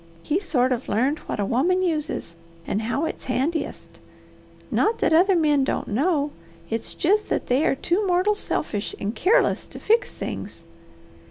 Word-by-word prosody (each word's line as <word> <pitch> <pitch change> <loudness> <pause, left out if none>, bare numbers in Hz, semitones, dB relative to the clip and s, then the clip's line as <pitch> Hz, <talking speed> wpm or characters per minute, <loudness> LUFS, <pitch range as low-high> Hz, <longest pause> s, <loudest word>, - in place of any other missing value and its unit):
He 315 +5 +1
sort 260 -9 +1
of 250 0 -2
learned 260 +9 +1
what - - -3
a 200 - +1
woman 345 - +2
uses, 305 - -2 0.3
and 210 - -1
how 245 +8 -1
it's - - -5
handiest. 285 +6 -2 0.7
Not 450 +2 +2
that - - +2
other 365 +4 +5
men 300 -4 +3
don't - - -2
know; 290 - +1 0.4
it's 225 0 -3
jest 415 +5 +1
that - - -1
they 255 +4 +2
are - - +2
too 365 +8 0
mortal 365 +3 +3
selfish 210 - -3
and 205 +1 -2
keerless 455 - +2
to - - -10
fix 460 +2 +2
things. 200 - -6
300 Hz, 165 wpm, -24 LUFS, 250-365 Hz, 0.7 s, other